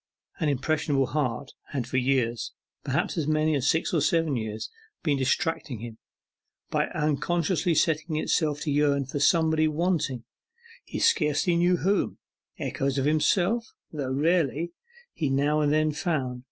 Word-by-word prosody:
An 155 -4 +1
impressionable 145 0 +1
heart 130 -1 -2 0.2
had 130 -4 -3
for 130 +2 -2
years 125 -4 0 0.3
perhaps 140 +6 -1
as 150 - -1
many 155 0 +2
as 140 0 +1
six 160 - +1
or 160 - +2
seven 165 -1 +2
years 110 -2 -4 0.4
been 150 -4 +2
distracting 135 0 -1
him, 115 0 -9 0.7
by - - +1
unconsciously 165 +3 0
setting 155 +1 +1
itself 150 -1 0
to 150 - -1
yearn 140 -1 +2
for 135 +2 -4
somebody 160 +1 +3
wanting, 155 -6 -1 0.6
he - - -6
scarcely 150 +2 +2
knew 175 +1 +3
whom. 195 +3 0 0.4
Echoes 135 0 -2
of 135 - +1
himself, 180 +9 +1 0.2
though 140 -4 -3
rarely, 165 +2 +1 0.4
he 150 -4 -1
now 145 +3 +2
and 145 -1 +2
then 155 0 +2
found. 145 -6 -2
150 Hz, 145 wpm, -26 LUFS, 135-165 Hz, 0.7 s, somebody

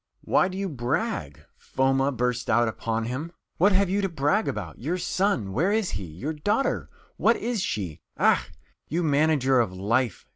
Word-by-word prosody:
"Why - - +3
do 190 0 -6
you 195 0 -1
brag?" 125 - -3
Foma, 135 +1 +1
bursts 125 -1 -1
out 120 +2 +4
upon 115 0 -2
him. 135 +8 -4 0.3
"What 200 +5 +5
have 195 0 +3
you 195 +3 0
to 195 - 0
brag 165 +7 +1
about? 95 -6 -4
Your 160 +9 -2
son 180 - 0
where 175 - +2
is 215 -3 +1
he? 100 -1 -4
Your 90 - -5
daughter 205 - 0 0.3
what 235 - +4
is 230 -2 -2
she? 90 - -3 0.2
Ekh, - - +3 0.4
you 170 +3 0
manager 145 -3 +3
of 115 -6 +1
life! 110 +5 -1
140 Hz, 175 wpm, -26 LUFS, 115-185 Hz, 0.4 s, What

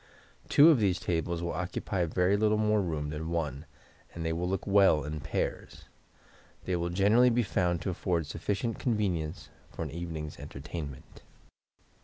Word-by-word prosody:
Two 155 +4 +8
of 145 - +3
these 95 -4 +2
tables 85 0 -2
will 85 - -2
occupy 90 +1 -2
very 90 +4 +2
little 105 +1 +2
more 105 -1 +2
room 75 -5 -3
than 80 +1 -4
one, 75 -3 -3 0.5
and 85 -1 -4
they 80 - 0
look 90 +3 -2
well 95 -7 +4
in 75 +2 -4
pairs. - - -4 0.8
They 90 - 0
will 85 0 -1
generally 105 +7 +4
be 120 0 +2
found 90 -5 0
to 95 - -1
afford 85 -2 -1
sufficient 100 - -3
convenience 95 - -1 0.2
for - - -5
an - - -5
evening's 80 -2 -6
entertainment. 70 -1 -8
85 Hz, 155 wpm, -30 LUFS, 80-100 Hz, 0.8 s, Two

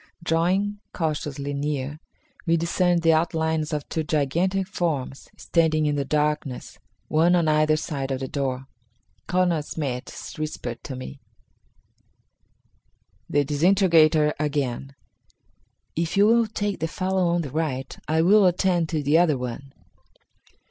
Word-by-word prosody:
Drawing 185 +6 +1
cautiously 145 -3 -3
near, 145 0 -3 0.5
we 165 0 +4
discerned 170 +1 +1
the 165 -1 +5
outlines 160 -1 0
of 150 -2 -3
two 160 - -2
gigantic 170 +6 0
forms, 155 -8 -3
standing 160 -2 +1
in 150 -1 +1
the 140 - 0
darkness, 150 -2 -2 0.3
one 165 +3 +3
on 170 -2 +2
either 155 0 +3
side 140 -4 -4
of 135 -1 -2
the 135 - -4
door. 130 -1 -3 0.6
Colonel 180 -3 +2
Smith 140 -4 -4 0.3
whispered 125 -6 -5
to 130 - -5
me: 130 +2 -8 2.1
The 145 0 +2
Disintegrator 155 -1 +4
Again. 140 -3 -2 1.0
"If 165 +3 -1
you 200 - +6
will 230 +1 +4
take 205 -1 -3
the 160 - -1
fellow 185 +1 0
on 170 0 +1
the 140 - -6
right, 140 -4 -2
I 160 +1 +2
will 200 +2 +6
attend 175 -2 +1
to 155 -3 -1
the 150 +4 +4
other 160 -5 +3
one." 125 +2 -6
155 Hz, 135 wpm, -24 LUFS, 145-175 Hz, 2.1 s, you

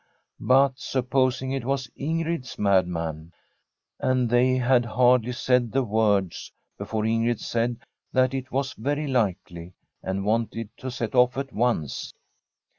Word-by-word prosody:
But 135 0 +3
supposing 130 0 0
it 135 -2 -2
was 135 0 -1
Ingrid's 160 -2 -3
madman 85 -5 0 0.7
I - - 0
And 125 -2 +1
they 125 +1 +3
had 125 0 +3
hardly 125 +1 +3
said 125 -1 +1
the 135 0 +1
words 105 -5 0 0.2
before 110 -1 -3
Ingrid 115 +1 +1
said 120 0 -1 0.3
that 130 0 +2
it 130 -1 -4
was 135 0 -1
very 145 +6 -2
likely, 95 - -2 0.3
and 95 +1 -3
wanted 115 0 -1
to 130 - -6
set 120 -2 -4
off 125 0 +4
at 135 -1 -4
once. 110 - -1
125 Hz, 135 wpm, -25 LUFS, 110-130 Hz, 0.7 s, off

